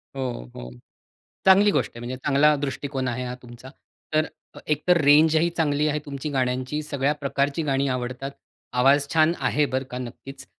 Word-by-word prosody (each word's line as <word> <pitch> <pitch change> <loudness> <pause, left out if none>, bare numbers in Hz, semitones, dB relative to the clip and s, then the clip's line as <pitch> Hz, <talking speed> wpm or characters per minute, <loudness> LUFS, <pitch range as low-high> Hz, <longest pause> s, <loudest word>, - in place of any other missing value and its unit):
हो, 125 - -4
हो, 60 - -8 0.8
चांगली 200 +2 +6
गोष्ट - - 0
आहे. 120 - -8
म्हणजे 120 +2 -5
चांगला 145 +3 +3
दृष्टिकोन 140 -1 -3
आहे 125 +1 -3
हा 125 0 -5
तुमचा. 120 +2 -12 0.4
तर 155 0 +3 0.3
अ, - - -9
एकतर 155 +4 +2
रेंजही 155 +3 +5
चांगली 150 -2 +1
आहे 150 0 0
तुमची 140 +1 -5
गाण्यांची. 130 +2 -1
सगळ्या 140 -1 0
प्रकारची 140 +1 -1
गाणी 140 -1 0
आवडतात. 130 +2 -4 0.4
आवाज 140 +3 +3
छान 160 +1 +4
आहे 150 - +2
बरं 130 -1 -2
का 125 - -4
नक्कीच 135 +2 -9
140 Hz, 165 wpm, -24 LUFS, 130-150 Hz, 0.8 s, चांगली